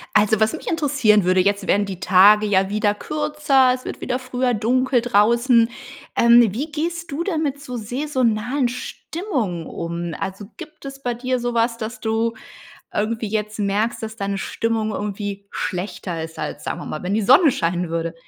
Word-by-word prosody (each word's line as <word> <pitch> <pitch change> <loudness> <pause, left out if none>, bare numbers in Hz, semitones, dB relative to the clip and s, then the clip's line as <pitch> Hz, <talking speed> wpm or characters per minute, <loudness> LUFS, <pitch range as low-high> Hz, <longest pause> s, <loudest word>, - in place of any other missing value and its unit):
Also, 210 0 +4
was 220 +4 +2
mich 320 - -8
interessieren 275 - +3
würde, 185 +1 +3
jetzt 200 0 0
werden 205 +1 +3
die 190 -2 -6
Tage 205 +3 +6
ja 190 -1 +2
wieder 205 0 +1
kürzer. 295 -1 +2
Es 255 - -12
wird - - -6
wieder 250 - -1
früher 255 -1 -1
dunkel 250 +3 +2
draußen. 235 +1 +3 0.5
Ähm, 235 0 +7
wie 285 +8 -4
gehst 335 +2 -3
du 300 +5 -2
denn 330 -4 -1
mit 280 -1 -2
so 250 -3 -6
saisonalen 250 +1 0
Stimmungen 245 - -4
um? 170 0 -4
Also, 195 +2 -5
gibt 310 -4 -11
es 275 0 -8
bei 245 - 0
dir 255 +1 -2
sowas, 235 -1 0
dass 230 +2 -6
du 225 +1 0 0.6
irgendwie 220 +1 -1
jetzt 215 0 -3
merkst, 210 +3 0
dass 220 0 -6
deine 200 -1 -2
Stimmung 225 +2 -1
irgendwie 205 -1 -4
schlechter 180 -2 -4
ist, 160 0 -9
als, - - -5
sagen - - -4
wir - - -7
mal, 155 - -5
wenn 185 +2 -1
die 220 - +1
Sonne 280 - +6
scheinen 175 -3 -1
würde? 165 0 -2
230 Hz, 175 wpm, -21 LUFS, 200-255 Hz, 0.6 s, Ähm